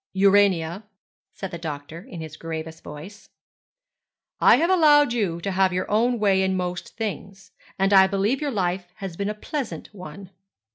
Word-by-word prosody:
'Urania,' 195 Hz, -2 st, +3 dB, 0.5 s
said 195 Hz, -2 st, -7 dB
the 170 Hz, -, -6 dB
doctor 155 Hz, 0 st, -6 dB
in 205 Hz, -9 st, -9 dB
his 155 Hz, -1 st, -8 dB
gravest 160 Hz, 0 st, -7 dB
voice, 170 Hz, +8 st, -11 dB, 1.1 s
'I -, -, +7 dB
have 335 Hz, +3 st, +1 dB
allowed 295 Hz, -7 st, +5 dB
you 195 Hz, -8 st, -1 dB
to 195 Hz, -, -2 dB
have 190 Hz, 0 st, +2 dB
your 180 Hz, +1 st, -2 dB
own 240 Hz, +3 st, +2 dB
way 200 Hz, -3 st, +2 dB
in 190 Hz, 0 st, +1 dB
most 180 Hz, -1 st, -5 dB
things, 195 Hz, -3 st, -6 dB, 0.3 s
and 195 Hz, +1 st, +2 dB
I 190 Hz, -1 st, +7 dB
believe 200 Hz, +8 st, 0 dB
your 295 Hz, -, -1 dB
life 185 Hz, -5 st, -2 dB
has 195 Hz, -4 st, -7 dB
been 200 Hz, +3 st, -2 dB
a 210 Hz, -, -3 dB
pleasant 260 Hz, +1 st, -5 dB
one.' 185 Hz, 0 st, -10 dB
195 Hz, 170 wpm, -24 LUFS, 175-210 Hz, 1.1 s, I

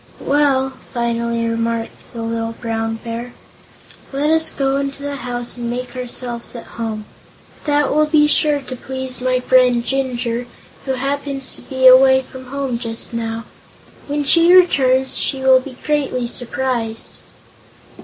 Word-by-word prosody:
"Well," 275 Hz, -2 st, +2 dB, 0.2 s
finally 235 Hz, -1 st, 0 dB
remarked 230 Hz, 0 st, -1 dB, 0.2 s
the 230 Hz, -2 st, -6 dB
little 230 Hz, 0 st, -2 dB
Brown 225 Hz, -1 st, -3 dB
Bear, 235 Hz, +1 st, -6 dB, 0.8 s
"let 285 Hz, +3 st, +1 dB
us 320 Hz, 0 st, +3 dB
go 275 Hz, 0 st, 0 dB
into 280 Hz, 0 st, -3 dB
the 285 Hz, 0 st, -3 dB
house 245 Hz, -2 st, -5 dB
and 240 Hz, -1 st, -3 dB
make 250 Hz, +1 st, -4 dB
ourselves 245 Hz, -1 st, -5 dB
at 235 Hz, -, -7 dB, 0.2 s
home. 215 Hz, -2 st, -3 dB, 0.6 s
That 290 Hz, -2 st, +2 dB
will 305 Hz, +1 st, +3 dB
be 300 Hz, -1 st, +4 dB
sure 295 Hz, -1 st, +3 dB
to 260 Hz, -1 st, -7 dB
please 260 Hz, 0 st, -5 dB
my 255 Hz, 0 st, +1 dB
friend 250 Hz, -2 st, +3 dB
Jinjur, 245 Hz, -3 st, -2 dB, 0.4 s
who 265 Hz, -, 0 dB
happens 275 Hz, +1 st, -2 dB
to -, -, -7 dB
be 260 Hz, -1 st, -2 dB
away 265 Hz, +1 st, +8 dB
from 260 Hz, 0 st, -11 dB
home 270 Hz, -2 st, -3 dB
just 230 Hz, -1 st, -5 dB
now. 230 Hz, 0 st, -3 dB, 0.6 s
When 290 Hz, 0 st, -1 dB
she 335 Hz, +4 st, +5 dB
returns, 265 Hz, -7 st, +4 dB
she 270 Hz, -, -1 dB
will 265 Hz, 0 st, +6 dB
be 255 Hz, -1 st, -10 dB
greatly 285 Hz, -5 st, 0 dB
surprised." 235 Hz, -2 st, -3 dB
255 Hz, 145 wpm, -19 LUFS, 235-275 Hz, 0.8 s, away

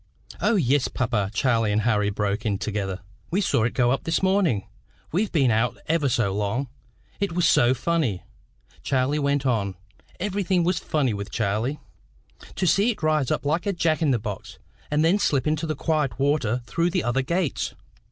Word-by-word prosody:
"O, 230 Hz, -, +3 dB
yes, 140 Hz, -, +2 dB
papa," 110 Hz, -6 st, -1 dB
Charlie 115 Hz, -2 st, +1 dB
and 105 Hz, +1 st, +2 dB
Harry 105 Hz, -3 st, +2 dB
broke 100 Hz, 0 st, -2 dB
in 105 Hz, -3 st, 0 dB
together. 100 Hz, -2 st, -3 dB, 0.3 s
"We 180 Hz, -, 0 dB
saw 120 Hz, -, +2 dB
it 120 Hz, -, -2 dB
go 120 Hz, -1 st, +3 dB
up 135 Hz, -, -1 dB
this 165 Hz, +3 st, 0 dB
morning. 190 Hz, -, +2 dB, 0.4 s
We've 200 Hz, +6 st, 0 dB
been 135 Hz, -7 st, +3 dB
out 115 Hz, +2 st, +1 dB
ever 155 Hz, -3 st, +1 dB
so 115 Hz, -6 st, +1 dB
long. 105 Hz, +6 st, -1 dB, 0.5 s
It 200 Hz, -4 st, -1 dB
was 175 Hz, 0 st, +2 dB
so 120 Hz, +2 st, +4 dB
funny," 130 Hz, -, -1 dB, 0.6 s
Charlie 135 Hz, +2 st, 0 dB
went 140 Hz, -1 st, 0 dB
on 105 Hz, -7 st, 0 dB, 0.4 s
everything 190 Hz, -2 st, 0 dB
was 180 Hz, +2 st, +1 dB
funny 140 Hz, -7 st, 0 dB
with 100 Hz, 0 st, -5 dB
Charlie 110 Hz, +8 st, -1 dB, 0.8 s
"to 185 Hz, -, -1 dB
see 200 Hz, +6 st, +3 dB
it 210 Hz, -8 st, -3 dB
rise 155 Hz, -4 st, +2 dB
up -, -, -1 dB
like 155 Hz, +7 st, 0 dB
a 200 Hz, -, +1 dB
Jack 165 Hz, -3 st, +1 dB
in 155 Hz, -, +2 dB
the 130 Hz, -, +3 dB
box, 105 Hz, -3 st, -7 dB, 0.3 s
and 150 Hz, +2 st, +2 dB
then 185 Hz, +5 st, +3 dB
slip 140 Hz, -9 st, +1 dB
into 155 Hz, +1 st, 0 dB
the 155 Hz, -, -2 dB
quiet 150 Hz, -5 st, -1 dB
water 135 Hz, -4 st, +1 dB
through 170 Hz, +7 st, 0 dB
the 180 Hz, 0 st, -1 dB
other 120 Hz, +2 st, +1 dB
gates!" 170 Hz, +3 st, -1 dB
135 Hz, 185 wpm, -24 LUFS, 110-165 Hz, 0.8 s, so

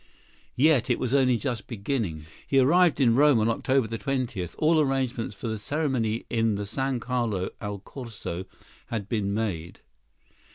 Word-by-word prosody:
Yet 135 Hz, -2 st, +4 dB
it 125 Hz, -, +3 dB
was 130 Hz, 0 st, -2 dB
only 130 Hz, -3 st, +4 dB
just 120 Hz, -4 st, -3 dB
beginning! 100 Hz, -, -3 dB, 0.2 s
He 135 Hz, -, +2 dB
arrived 165 Hz, +6 st, +5 dB
in 120 Hz, -4 st, +5 dB
Rome 145 Hz, -1 st, +5 dB
on 110 Hz, -, +2 dB
October 130 Hz, +1 st, +1 dB
20. 125 Hz, -6 st, -2 dB
All 160 Hz, +1 st, +3 dB
arrangements 130 Hz, -6 st, 0 dB
for 115 Hz, -, -6 dB
the 110 Hz, -1 st, -3 dB
ceremony 125 Hz, -4 st, -1 dB
in 115 Hz, -3 st, +1 dB
the 100 Hz, 0 st, -3 dB
San 130 Hz, +4 st, -1 dB
Carlo 115 Hz, -6 st, -1 dB
al 100 Hz, 0 st, -4 dB
Corso 100 Hz, -5 st, -7 dB, 0.4 s
had 110 Hz, -4 st, -4 dB
been 105 Hz, -3 st, -1 dB
made. 100 Hz, -6 st, -3 dB
120 Hz, 155 wpm, -26 LUFS, 105-135 Hz, 0.4 s, arrived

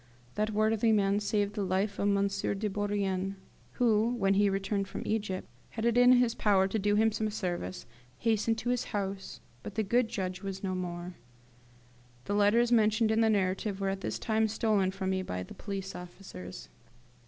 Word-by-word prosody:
That 215 Hz, +1 st, 0 dB
worthy 220 Hz, +1 st, +2 dB
man 200 Hz, -1 st, +3 dB
saved 205 Hz, 0 st, 0 dB
the 210 Hz, -, -3 dB
life 195 Hz, +2 st, -1 dB
of 200 Hz, -, +1 dB
M. 200 Hz, 0 st, +3 dB
de 200 Hz, +1 st, -2 dB
Bourrienne, 195 Hz, -1 st, -1 dB, 0.4 s
who, 230 Hz, 0 st, +2 dB
when 195 Hz, -4 st, +2 dB
he 200 Hz, +1 st, +4 dB
returned 195 Hz, +1 st, -1 dB
from -, -, -6 dB
Egypt, 205 Hz, -4 st, -2 dB
and -, -, -26 dB
had 225 Hz, 0 st, -2 dB
it 235 Hz, -1 st, +3 dB
in 245 Hz, +1 st, +7 dB
his 245 Hz, -2 st, +3 dB
power 200 Hz, -5 st, +3 dB
to 220 Hz, -, -1 dB
do 205 Hz, +1 st, +2 dB
him 220 Hz, +1 st, +4 dB
some 215 Hz, 0 st, -1 dB
service, 175 Hz, -, -4 dB, 0.3 s
hastened 225 Hz, +2 st, +1 dB
to 240 Hz, -, -3 dB
his 250 Hz, -, -1 dB
house; 195 Hz, -1 st, -5 dB, 0.2 s
but 200 Hz, -, -8 dB
the 220 Hz, -, +1 dB
good 235 Hz, +4 st, +2 dB
judge 185 Hz, -3 st, -4 dB
was 195 Hz, -1 st, -5 dB
no 190 Hz, -1 st, -1 dB
more! 175 Hz, -1 st, -5 dB, 1.1 s
The -, -, -2 dB
letters 210 Hz, +4 st, +3 dB
mentioned 220 Hz, -1 st, +3 dB
in 220 Hz, +1 st, +3 dB
the 225 Hz, -, +4 dB
narrative 195 Hz, 0 st, 0 dB
were 195 Hz, -1 st, 0 dB
at 195 Hz, 0 st, -3 dB
this -, -, -3 dB
time 220 Hz, -1 st, +1 dB
stolen 210 Hz, -3 st, +1 dB
from 190 Hz, 0 st, -3 dB
me 190 Hz, 0 st, 0 dB
by 90 Hz, -, -4 dB
the -, -, -11 dB
police 195 Hz, -1 st, -5 dB
officers. 175 Hz, -, -9 dB
205 Hz, 190 wpm, -30 LUFS, 190-220 Hz, 1.1 s, in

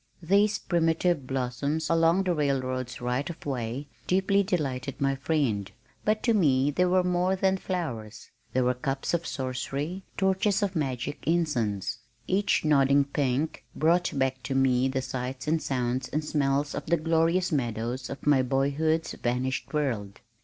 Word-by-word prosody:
These 200 Hz, +5 st, +3 dB
primitive 165 Hz, -3 st, +1 dB
blossoms 135 Hz, +4 st, -1 dB
along 165 Hz, +3 st, +3 dB
the 180 Hz, -2 st, +1 dB
railroad's 130 Hz, -4 st, -1 dB
right 125 Hz, +5 st, -1 dB
of 170 Hz, -, -9 dB
way 130 Hz, 0 st, -3 dB, 0.2 s
deeply 195 Hz, +2 st, +3 dB
delighted 140 Hz, -9 st, -2 dB
my 135 Hz, 0 st, +2 dB
friend, 130 Hz, -9 st, -1 dB, 0.3 s
but 215 Hz, 0 st, +1 dB
to 235 Hz, -, +3 dB
me 145 Hz, -8 st, +3 dB
they 180 Hz, +5 st, +2 dB
were 180 Hz, 0 st, +3 dB
more 180 Hz, +1 st, +1 dB
than 190 Hz, 0 st, +2 dB
flowers, 120 Hz, -, -5 dB, 0.2 s
they 130 Hz, -, +1 dB
were 125 Hz, 0 st, +2 dB
cups 135 Hz, +4 st, -3 dB
of 170 Hz, -1 st, 0 dB
sorcery, 140 Hz, +7 st, -3 dB
torches 190 Hz, +1 st, +2 dB
of 195 Hz, -2 st, -1 dB
magic 135 Hz, -2 st, -2 dB
incense. 125 Hz, -, 0 dB, 0.3 s
Each 195 Hz, -3 st, +1 dB
nodding 140 Hz, -1 st, +4 dB
pink 140 Hz, +1 st, -1 dB
brought 170 Hz, 0 st, +2 dB
back 130 Hz, -1 st, 0 dB
to 135 Hz, -, -3 dB
me 130 Hz, -1 st, +3 dB
the 130 Hz, 0 st, -1 dB
sights 130 Hz, +1 st, -5 dB
and 160 Hz, +1 st, +2 dB
sounds 125 Hz, -1 st, -1 dB
and 155 Hz, +1 st, -2 dB
smells 145 Hz, -1 st, 0 dB
of -, -, -5 dB
the 170 Hz, +2 st, +3 dB
glorious 165 Hz, +3 st, +2 dB
meadows 120 Hz, -2 st, -2 dB
of 135 Hz, -, -7 dB
my 145 Hz, -3 st, +5 dB
boyhood's 140 Hz, +5 st, +1 dB
vanished 125 Hz, +2 st, -2 dB
world. 115 Hz, -10 st, -2 dB
140 Hz, 155 wpm, -27 LUFS, 130-170 Hz, 0.3 s, my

